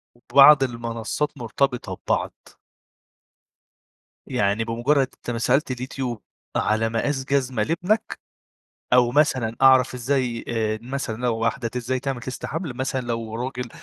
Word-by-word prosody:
وبعض 140 Hz, +3 st, +6 dB
المنصات 115 Hz, +3 st, -3 dB
مرتبطة 125 Hz, +2 st, -1 dB
ببعض. -, -, 0 dB, 1.9 s
يعني 100 Hz, +3 st, 0 dB
بمجرّد 130 Hz, +5 st, +1 dB
أنت 120 Hz, -, -6 dB
ما 115 Hz, -, -3 dB
سألت 130 Hz, +4 st, +1 dB
اليوتيوب 125 Hz, -2 st, -4 dB, 0.3 s
على 110 Hz, +1 st, +1 dB
مقاس 130 Hz, +4 st, -1 dB
جزمة 130 Hz, -5 st, 0 dB
لابنك، 180 Hz, -, -1 dB, 0.7 s
أو 125 Hz, -1 st, +5 dB
مثلًا 130 Hz, -6 st, +2 dB
أعرف 130 Hz, -2 st, +6 dB
إزاي 125 Hz, -1 st, -1 dB
آآ، 110 Hz, -2 st, -1 dB
مثلًا 130 Hz, -2 st, -4 dB
لو 120 Hz, -2 st, 0 dB
واحدة 115 Hz, +2 st, -1 dB
ت 115 Hz, -, -11 dB
إزاي 125 Hz, +1 st, -1 dB
تعمل 135 Hz, -2 st, -3 dB
test 130 Hz, -, -5 dB
حمل 160 Hz, -3 st, -4 dB
مثلًا، 130 Hz, 0 st, -2 dB
لو 115 Hz, -2 st, -4 dB
راجل 125 Hz, 0 st, -4 dB
125 Hz, 130 wpm, -23 LUFS, 115-135 Hz, 1.9 s, وبعض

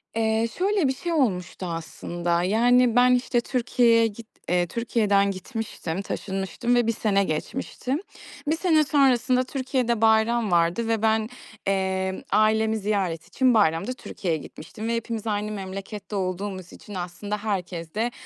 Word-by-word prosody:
Eee, 225 Hz, 0 st, +1 dB
şöyle 385 Hz, -4 st, +2 dB
bir 265 Hz, -, 0 dB
şey 340 Hz, +6 st, -4 dB
olmuştu 190 Hz, -, 0 dB
aslında, 170 Hz, +1 st, -2 dB
yani, 240 Hz, +4 st, +4 dB
ben, 250 Hz, 0 st, +6 dB
işte, 245 Hz, -1 st, +1 dB
Türkiye'ye 235 Hz, -2 st, +3 dB
git 225 Hz, +1 st, -10 dB, 0.2 s
eee, 175 Hz, 0 st, +2 dB
Türkiye'den 205 Hz, -3 st, +1 dB
gitmiştim, 195 Hz, -3 st, -5 dB
taşınmıştım 195 Hz, +4 st, -2 dB
ve 240 Hz, -2 st, +2 dB
1 -, -, +3 dB
sene 205 Hz, -3 st, +1 dB
geçmişti. 245 Hz, -, -3 dB, 0.5 s
1 315 Hz, -, +2 dB
sene 320 Hz, -3 st, +3 dB
sonrasında 255 Hz, -3 st, +3 dB
Türkiye'de 255 Hz, -4 st, -1 dB
bayram 220 Hz, 0 st, +3 dB
vardı 175 Hz, +6 st, +2 dB
ve 225 Hz, -2 st, 0 dB
ben, 220 Hz, 0 st, +2 dB, 0.4 s
eee, 190 Hz, -1 st, -1 dB
ailemi 220 Hz, +1 st, +3 dB
ziyaret 195 Hz, -6 st, -1 dB
için 260 Hz, -2 st, +2 dB
bayramda 200 Hz, +2 st, +2 dB
Türkiye'ye 175 Hz, -9 st, -3 dB
gitmiştim 210 Hz, +9 st, -8 dB
ve 235 Hz, -, 0 dB
hepimiz 230 Hz, -1 st, -4 dB
aynı 210 Hz, 0 st, -1 dB
memlekette 195 Hz, +1 st, -6 dB
olduğumuz 185 Hz, -1 st, -3 dB
için 205 Hz, -, -12 dB
aslında 185 Hz, +4 st, -4 dB
herkes 180 Hz, -6 st, -4 dB
de, 230 Hz, +3 st, 0 dB
215 Hz, 140 wpm, -25 LUFS, 190-240 Hz, 0.5 s, ben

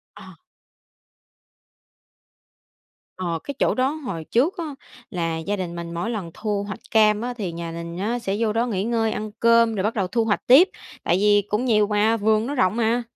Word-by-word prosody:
Ờ. -, -, -12 dB, 2.8 s
Ờ, 170 Hz, -3 st, -2 dB
cái 285 Hz, -, -5 dB
chỗ -, -, +2 dB
đó 260 Hz, +2 st, +1 dB
hồi 255 Hz, -, -5 dB
trước 280 Hz, -, +1 dB
á 335 Hz, -, -2 dB, 0.5 s
là 165 Hz, -3 st, -2 dB
gia 200 Hz, +5 st, -2 dB
đình 175 Hz, -2 st, -4 dB
mình 170 Hz, 0 st, -6 dB
mỗi 175 Hz, +8 st, -2 dB
lần 195 Hz, -7 st, -4 dB
thu 205 Hz, -2 st, -2 dB
hoạch 205 Hz, -, -6 dB
cam 215 Hz, -1 st, +4 dB
á 245 Hz, +1 st, -3 dB
thì 195 Hz, -7 st, -4 dB
nhà 170 Hz, 0 st, -5 dB
mình 170 Hz, +1 st, -7 dB
á 230 Hz, +5 st, -1 dB
sẽ 200 Hz, -3 st, -2 dB
vô 225 Hz, -2 st, +1 dB
đó 230 Hz, +2 st, +1 dB
nghỉ 200 Hz, -4 st, -2 dB
ngơi, 225 Hz, -1 st, 0 dB
ăn 215 Hz, 0 st, -4 dB
cơm 230 Hz, -1 st, +4 dB
rồi 195 Hz, -1 st, -2 dB
bắt 220 Hz, -, 0 dB
đầu 195 Hz, -4 st, 0 dB
thu 230 Hz, +3 st, 0 dB
hoạch 210 Hz, -2 st, -1 dB
tiếp. 300 Hz, +10 st, +7 dB, 0.3 s
Tại 175 Hz, -, +2 dB
vì 205 Hz, +1 st, +4 dB
cũng 215 Hz, +5 st, 0 dB
nhiều 210 Hz, -4 st, +3 dB
mà, 215 Hz, +2 st, +2 dB
vườn 215 Hz, +1 st, +2 dB
nó 285 Hz, -, -3 dB
rộng 220 Hz, -5 st, +2 dB
mà. 235 Hz, +1 st, +1 dB
215 Hz, 200 wpm, -23 LUFS, 185-230 Hz, 2.8 s, tiếp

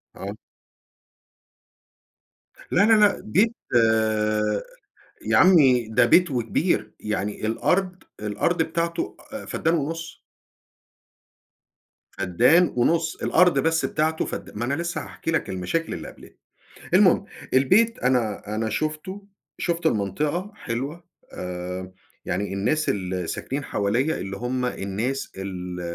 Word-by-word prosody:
آه. -, -, -6 dB, 2.4 s
لا، -, -, +4 dB
لا، 225 Hz, -, +5 dB
لأ، 210 Hz, -1 st, +4 dB
بيت، 215 Hz, -, +2 dB, 0.2 s
آآ، 110 Hz, -2 st, +2 dB, 0.6 s
يا -, -, +1 dB
عمي 135 Hz, -11 st, +5 dB
ده 110 Hz, -, +4 dB
بيت 180 Hz, -2 st, +5 dB
وكبير. 120 Hz, -3 st, 0 dB
يعني 105 Hz, 0 st, -3 dB
الأرض 180 Hz, -, 0 dB, 0.2 s
الأرض 105 Hz, -, 0 dB
بتاعته، 170 Hz, +1 st, -2 dB, 0.2 s
آآ، 275 Hz, -, -6 dB
فدان 165 Hz, +1 st, 0 dB
ونُّص. 165 Hz, +2 st, -3 dB, 1.9 s
فدان 120 Hz, -, +3 dB
ونُّص، 160 Hz, +6 st, +1 dB
الأرض 175 Hz, -4 st, +3 dB
بس 165 Hz, +3 st, +1 dB
بتاعته 160 Hz, +1 st, 0 dB
فدا -, -, -6 dB
ما 120 Hz, -, -2 dB
أنا 130 Hz, -, -1 dB
لسة 170 Hz, +3 st, -2 dB
هاحكي 165 Hz, -, -5 dB
لك 160 Hz, -, 0 dB
المشاكل 95 Hz, -, -2 dB
اللي -, -, -6 dB
قبلتني. -, -, -14 dB, 0.6 s
المهم، -, -, +5 dB, 0.3 s
البيت 205 Hz, -, +4 dB
أنا، 115 Hz, -5 st, 0 dB
أنا 110 Hz, 0 st, -1 dB
شُفته، 155 Hz, -, -4 dB, 0.3 s
شُفت 170 Hz, -1 st, -1 dB
المنطقة 150 Hz, -, -1 dB
حلوة، 140 Hz, -, -5 dB, 0.3 s
آآ، 90 Hz, +1 st, -6 dB, 0.3 s
يعني 95 Hz, +2 st, -2 dB
الناس 155 Hz, +11 st, 0 dB
الـلي 90 Hz, -2 st, -2 dB
ساكنين 135 Hz, -, -4 dB
حواليّ 120 Hz, +11 st, 0 dB
اللي 95 Hz, +1 st, -5 dB
هُم 125 Hz, +3 st, -2 dB
الناس 120 Hz, +6 st, -3 dB
ال 90 Hz, -2 st, -5 dB
130 Hz, 115 wpm, -24 LUFS, 105-165 Hz, 2.4 s, لا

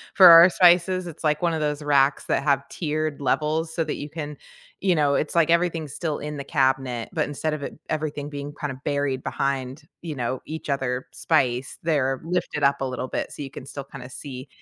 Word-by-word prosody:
for 190 Hz, -2 st, +9 dB
our 170 Hz, +1 st, +10 dB
spices. 180 Hz, 0 st, +4 dB
It's 165 Hz, 0 st, -9 dB
like 150 Hz, 0 st, +1 dB
one 170 Hz, -2 st, +1 dB
of 160 Hz, -, -2 dB
those 150 Hz, 0 st, -1 dB
racks 140 Hz, -1 st, +3 dB
that 135 Hz, -, 0 dB
have 140 Hz, -1 st, +1 dB
tiered 155 Hz, -2 st, -2 dB
levels 155 Hz, +3 st, 0 dB
so 165 Hz, -, 0 dB
that 155 Hz, -, -3 dB
you 145 Hz, -, -6 dB
can, 150 Hz, -2 st, -6 dB, 0.5 s
you 185 Hz, -3 st, +3 dB
know, 145 Hz, -2 st, +2 dB
it's 150 Hz, +3 st, -1 dB
like 165 Hz, -1 st, +4 dB
everything's 170 Hz, -4 st, +1 dB
still 160 Hz, -4 st, -2 dB
in 150 Hz, 0 st, -5 dB
the 140 Hz, -, -5 dB
cabinet, 130 Hz, -4 st, 0 dB
but 155 Hz, -, +1 dB
instead 150 Hz, +2 st, -2 dB
of 145 Hz, -2 st, -4 dB
it -, -, -6 dB
everything 150 Hz, -2 st, -3 dB
being 145 Hz, 0 st, -6 dB
kind 150 Hz, -1 st, -5 dB
of 130 Hz, +1 st, -11 dB
buried 140 Hz, -2 st, -1 dB
behind, 135 Hz, +1 st, -2 dB, 0.2 s
you 160 Hz, -4 st, -5 dB
know, 125 Hz, 0 st, -3 dB
each 160 Hz, 0 st, -7 dB
other 130 Hz, -2 st, -1 dB
spice, 130 Hz, -5 st, 0 dB
they're 135 Hz, -5 st, +1 dB
lifted 165 Hz, -4 st, -2 dB
up 140 Hz, 0 st, +3 dB
a -, -, 0 dB
little 130 Hz, 0 st, -4 dB
bit -, -, -3 dB
so -, -, -8 dB
you 135 Hz, -, -8 dB
can 130 Hz, -, -9 dB
still 140 Hz, 0 st, -7 dB
kinda 130 Hz, -2 st, -10 dB
see, 130 Hz, 0 st, -8 dB
145 Hz, 220 wpm, -24 LUFS, 135-160 Hz, 0.5 s, our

